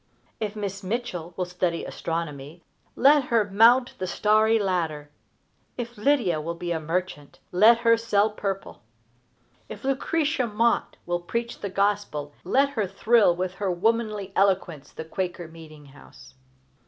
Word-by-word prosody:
If 215 -1 -3
Miss 200 -2 -4
Mitchell 185 -5 -4
will 180 - -1
study 180 -1 -2
astronomy, 165 -1 -5 0.3
let 280 +1 +5
her 230 -4 +2
mount 240 +5 +5
the 185 - -3
starry 215 +3 +3
ladder. 165 -7 -2 0.7
If 240 -1 -5
Lydia 210 - +1
will 170 +2 -4
be 175 +1 -5
a 165 - -1
merchant, 160 -2 -4
let 215 +6 +6
her 230 0 +6
sell 220 -2 +1
purple. 195 -2 -5 0.9
If - - -9
Lucretia 280 0 0
Mott 230 +2 0
will 175 0 -1
preach 235 +7 -4
the 200 - -4
Gospel, 195 -7 -1
let 275 +2 +2
her 220 -8 -2
thrill 205 -1 +3
with 180 +1 -3
her 195 - 0
womanly 210 +1 -1
eloquence 185 -7 0
the 160 - -8
Quaker 175 0 -4
meeting 155 -2 -13
house. 135 - -16
195 Hz, 140 wpm, -25 LUFS, 170-230 Hz, 0.9 s, let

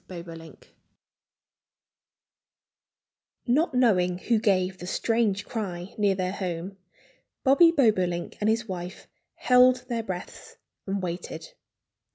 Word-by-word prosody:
BOBOLINK 165 -2 -11 2.7
Not 275 +3 +1
knowing 180 -8 +3
who 225 +4 +1
gave 190 -3 +1
the 180 - -7
strange 215 -1 0
cry 185 -5 -5
near 205 -2 +2
their 185 -1 -2
home, 185 0 -5 0.7
Bobby 295 +5 +6
Bobolink 185 - +1
and 210 - +2
his 225 +1 0
wife 180 0 -7 0.3
held 250 0 +4
their 235 -1 -1
breaths 185 -5 -8 0.3
and 195 0 -2
waited. 180 - -6
195 Hz, 105 wpm, -26 LUFS, 180-235 Hz, 2.7 s, Bobby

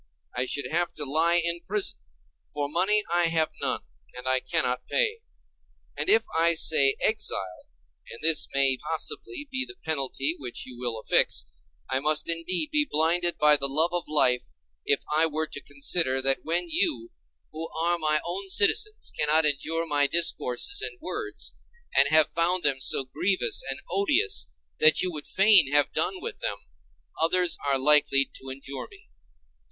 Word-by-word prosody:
I 125 +1 -2
should 145 - -3
have 175 +2 -1
to 150 - -4
lie 160 +5 +2
in 170 0 -1
prison, 195 - -3 0.5
for 145 -1 -3
money 190 +7 +1
I 175 0 +3
have 160 -1 +1
none, - - -2 0.3
and 125 +1 -8
I 130 0 +2
cannot 125 0 -2
pay. 460 -2 0 0.8
And - - -2
if 440 +3 +4
I 165 +1 +5
say 145 -4 +4
exile 95 - -1 0.4
(and - - -10
this 160 -1 +3
may 135 -1 +2
possibly 295 - -4
be 260 0 -1
the 385 - -9
penalty 140 -1 0
which 125 -3 -5
you 125 - -11
will 120 -3 -3
affix), - - +2 0.4
I 130 0 -1
must 150 +2 +1
indeed 175 - -1
be 300 -1 +2
blinded 170 +3 +1
by 150 0 +5
the 140 - -1
love 160 +5 +1
of 175 -1 -3
life 125 - +1 0.3
if 140 - +1
I 160 +1 +3
were 160 0 -2
to 145 -2 -7
consider 140 0 +1
that 135 0 +2
when 170 +2 0
you, 120 -7 0 0.4
who 160 +1 -7
are 170 +2 -1
my 155 -1 0
own 190 +3 -5
citizens, 425 - +1
cannot 155 +1 +3
endure 160 +3 -1
my 145 -3 +2
discourses 170 - 0
and 425 -2 -6
words, 410 +5 -5 0.4
and 140 - +5
have 155 +1 +4
found 175 +2 0
them 140 -2 +1
so 135 0 +2
grievous 180 +9 0
and 135 - -4
odious 135 - +1 0.3
that 155 0 +5
you 185 - -2
would 150 -3 -7
fain 195 -8 +5
have 145 -1 +2
done 380 - -2
with 430 +3 -7
them, 100 - -4 0.6
others 180 +1 +2
are 140 -1 +2
likely 140 0 +3
to 135 - -10
endure 135 0 -8
me. - - -20
160 Hz, 170 wpm, -25 LUFS, 140-175 Hz, 0.8 s, I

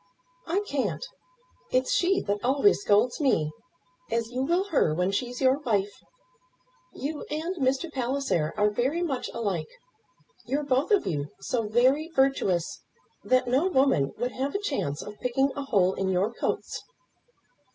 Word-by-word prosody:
"I 360 +4 +1
can't. 285 - -2 0.6
It's 255 0 +1
she 375 +2 +2
that 205 0 -2
always 275 +13 +3
scolds 235 - +2
me, 160 - +2 0.6
as 230 0 -1
you 250 +1 -2
will 345 +7 +2
her, 215 - +2
when 180 +3 +1
she's 245 +4 -2
your 265 +1 +3
wife. 205 -7 0 1.0
You 295 +2 -5
and 320 +5 -2
Mr. 275 +3 0
Palliser 255 - 0
are 210 0 +3
very 265 +11 0
much 270 -7 -2
alike. 195 -9 -2 0.8
You're 280 +4 0
both 270 +1 +1
of 415 -2 +3
you 150 -5 -2
so 225 +2 -1
very 260 +8 +3
virtuous 265 - +1 0.4
that 255 0 +2
no 265 +8 +2
woman 265 - +2
would 245 +2 -1
have 270 +7 -3
a - - +1
chance 275 - -2
of 210 0 -10
picking 270 +3 +1
a 280 - -4
hole 190 -7 +3
in 190 0 -1
your 190 +5 +1
coats." - - -3
255 Hz, 150 wpm, -27 LUFS, 205-285 Hz, 1.0 s, always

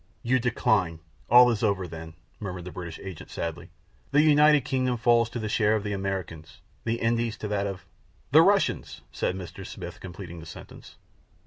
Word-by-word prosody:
"You 130 +2 +2
decline! 105 -8 +1 0.3
All 125 +1 +8
is 110 - -2
over 100 -5 +1
then!" 80 -1 -9 0.2
murmured 95 -4 -6
the 90 - -7
British 85 -3 -7
agent 95 -5 -9
sadly. 85 +1 -5 0.4
"The 145 +2 +4
United 150 -2 +5
Kingdom 130 -2 0
falls 120 0 +3
to 120 - -6
the 110 -2 -3
share 105 0 +2
of 105 - -2
the 105 -1 -2
Americans; 95 -5 -5 0.3
the 115 0 +1
Indies 115 0 0
to 105 - -5
that 100 -1 0
of 95 -2 -6 0.2
" - - -35
"The - - +8
Russians," - - +1
said 90 - -1
Mr. 90 0 -8
Smith, 90 -2 -8
completing 90 -2 -8
the 80 - -10
sentence. 80 - -12
100 Hz, 185 wpm, -27 LUFS, 90-120 Hz, 0.4 s, All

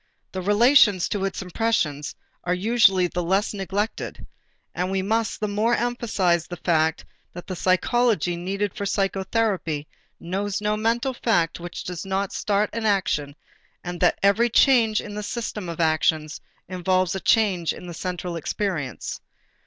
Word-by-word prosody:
The 190 - -4
relations 205 -1 +5
to 205 - -1
the 195 0 -1
impressions 175 -7 -1 0.3
are 180 +1 0
usually 195 -2 +4
the 175 0 -2
less 190 +5 0
neglected: 200 +2 -3 0.5
and 180 +1 -2
we 190 0 -1
must 220 +3 0
the 210 - -1
more 215 +4 +1
emphasize 210 -9 0
the 175 - -7
fact 160 -2 +1 0.3
that 175 - -8
the 185 - -5
psychology 185 0 +2
needed 195 +3 -2
for - - -5
psychotherapy 195 -5 -1 0.3
knows 195 +3 -2
no 210 0 0
mental 235 +5 0
fact 175 -11 0
which 175 0 -7
does 180 -2 -5
not 195 0 -2
start 205 0 0
an 230 -1 -1
action 150 -8 0 0.5
and 175 -1 -5
that - - +3
every 215 +4 +4
change 230 -3 +4
in 210 - -8
the 210 - -4
system 210 -4 -4
of 170 - -6
actions 155 -1 +1 0.3
involves 185 0 0
a 195 - -2
change 190 -6 +2
in - - -9
the 175 - -7
central 180 0 -4
experience. 165 - -3
195 Hz, 155 wpm, -24 LUFS, 175-215 Hz, 0.5 s, relations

